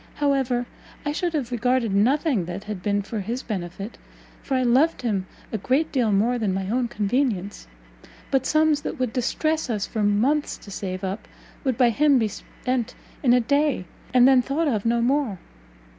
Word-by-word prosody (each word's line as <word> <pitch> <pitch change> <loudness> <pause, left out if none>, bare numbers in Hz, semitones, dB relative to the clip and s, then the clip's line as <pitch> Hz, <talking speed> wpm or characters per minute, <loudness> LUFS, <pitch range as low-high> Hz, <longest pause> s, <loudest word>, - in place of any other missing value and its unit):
However, 265 -4 +1 0.4
I 290 - 0
should 340 +3 -1
have 270 -6 -2
regarded 245 -2 +1
nothing 250 - +2
that 180 +3 -6
had 210 -1 -5
but 180 - -16
been 205 0 +1
for 215 +2 -4
his 230 +6 -3
benefit, 195 0 -5 0.4
for 270 - -2
I 255 - +2
loved 260 +6 +3
him 200 -5 -1 0.2
a 220 - -2
great 275 +10 +1
deal 240 -6 +1
more 230 +5 +2
than 200 -4 0
my 190 0 -2
own 245 0 +1
convenience; 210 - -1 0.6
but 265 -1 +2
sums 310 -1 +3
that 315 - -4
would 255 -4 -1
distress 310 +5 0
us 210 -4 -1
for 220 - -3
months 230 +9 +1
to 200 - -13
save 185 -1 -5
up, 195 +3 -4 0.4
would 260 -5 0
by 245 -2 +4
him 285 +3 +4
be 220 -3 +1
spent 250 +3 -4 0.3
in 250 - +3
a 250 - +6
day, 280 -3 +1 0.3
and 250 0 +6
then 265 -2 +6
thought 290 +6 -1
of 225 -5 0
no 235 0 +2
more! 260 -5 +1
245 Hz, 190 wpm, -24 LUFS, 205-275 Hz, 0.6 s, a